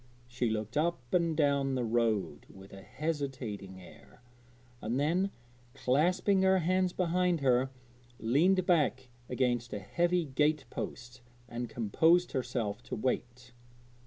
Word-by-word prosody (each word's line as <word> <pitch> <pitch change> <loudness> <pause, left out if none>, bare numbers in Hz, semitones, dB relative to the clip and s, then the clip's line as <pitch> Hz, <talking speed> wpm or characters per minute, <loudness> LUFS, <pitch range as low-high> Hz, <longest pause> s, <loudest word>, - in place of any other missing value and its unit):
She 120 0 -1
looked 110 +3 -3
up 150 -6 -1
and 170 -3 +2
down 140 -3 +2
the 125 - 0
road 110 -9 0
with 95 0 -14
a 95 - -10
hesitating 130 -11 -4
air, 95 +6 -16 0.6
and 115 +5 -1
then, 175 +7 +1 0.5
clasping 180 +8 +2
her 190 0 +4
hands 185 +1 +1
behind 180 -2 +1
her, 130 0 +3 0.5
leaned 175 +12 +2
back 140 -7 +1 0.2
against 120 -2 0
a 105 - -3
heavy 175 - 0
gate 150 +2 +1
post 120 -1 -6 0.3
and 120 0 -5
composed 165 - +2
herself 120 -6 -2
to - - -4
wait. 125 +1 -3
130 Hz, 130 wpm, -31 LUFS, 120-170 Hz, 0.6 s, her